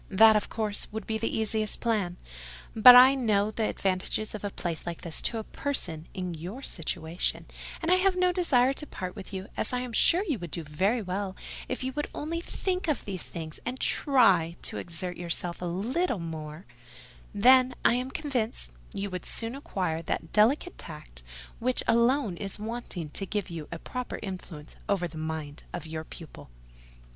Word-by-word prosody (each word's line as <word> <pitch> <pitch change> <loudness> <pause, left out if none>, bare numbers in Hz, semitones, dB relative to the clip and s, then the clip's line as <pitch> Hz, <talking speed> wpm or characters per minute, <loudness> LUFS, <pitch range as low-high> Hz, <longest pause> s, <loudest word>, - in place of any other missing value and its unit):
That, 220 +2 +7
of 210 - +1
course, 215 -2 0
would 220 +1 -5
be 220 0 -2
the 225 - 0
easiest 220 -1 +1
plan: 205 -7 0 0.6
but 245 +3 +11
I 255 +2 +10
know 215 -5 +2
the 220 0 -1
advantages 195 +3 -1
of 215 - -6
a 205 - -1
place 175 -3 -4
like 170 -1 -4
this 165 -2 -2
to 230 - 0
a 220 - -3
person 165 - -2
in 180 -3 -4
your 180 - -7
situation; 165 -2 -2 0.4
and 330 - +1
I 365 - +6
have 375 0 +3
no 365 0 +3
desire 275 -8 +3
to 300 +2 -8
part 185 -5 -6
with 200 -2 -8
you, 190 0 -5
as - - -1
I 250 - 0
am 250 -2 -5
sure 345 - +5
you 285 - 0
would 175 -1 -6
do 170 - -3
very 195 +10 0
well 190 +1 -3 0.3
if 255 - -3
you 260 0 -2
will 295 +2 -1
only 330 +3 -3
think 365 +1 -2
of 305 - 0
these 190 -3 -4
things 160 -2 -7
and 255 +2 -4
try 195 - +3
to - - -1
exert 175 +1 -2
yourself 175 0 -2
a - - -2
little 230 - 0
more: 160 -1 -6 0.7
then, 255 +4 +5
I - - +6
am 250 +2 -1
convinced, 250 - -2 0.2
you 200 0 -3
would 180 -2 -5
soon 230 +1 -3
acquire 185 - -2
that 160 0 -4
delicate 255 - +3
tact 150 - -9 0.4
which 250 +2 0
alone 235 -4 +3
is 195 +1 -4
wanting 210 -8 -5
to 195 - 0
give 205 -3 -2
you 160 -3 -6
a 170 - -4
proper 250 +8 -5
influence 180 -6 -7
over 190 -3 +1
the 165 -2 -9
mind 155 -2 -5
of - - -5
your 160 0 -5
pupil." 160 - -11
205 Hz, 190 wpm, -28 LUFS, 170-250 Hz, 0.7 s, but